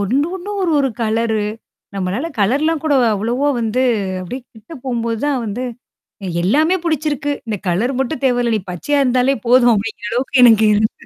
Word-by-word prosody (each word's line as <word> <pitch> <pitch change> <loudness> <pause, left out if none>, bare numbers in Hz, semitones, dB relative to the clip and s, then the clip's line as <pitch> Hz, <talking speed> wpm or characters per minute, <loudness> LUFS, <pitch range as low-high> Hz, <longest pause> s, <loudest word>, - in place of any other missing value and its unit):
ஒண்ணும் 270 - 0
ஒண்ணும் 405 +3 -6
ஒரு, 345 -3 +1
ஒரு 270 - +1
கலரு. 220 -1 0 0.5
நம்மளால 195 - -2
கலர்லாம் 290 +10 +1
கூட 300 -2 +2 0.2
அவ்வளவா 240 +8 0
வந்து 230 +3 0 0.4
அப்பிடியே 220 +9 -6
கிட்டு 225 +9 -12
போம்போது 230 -2 -2
தான் 275 -3 0
வந்து 225 +4 -4 0.6
எ - - -4 0.2
எல்லாமே 310 - +3
புடிச்சிருக்கு. 300 -3 -1
இந்த 220 -2 -3
கலர் 195 +9 +1
மட்டும் 265 +1 -2
தேவையில்ல. 245 -2 +1
நீ - - 0
பச்சையா 285 - -1
இருந்தாலே 255 +1 +2
போதும் 245 0 +5
அப்பிடிங்கிற 210 0 -3
அளவுக்கு 260 +1 +1
எனக்கு 225 -2 +6
இருந் 215 +1 +2
245 Hz, 165 wpm, -18 LUFS, 220-285 Hz, 0.6 s, எனக்கு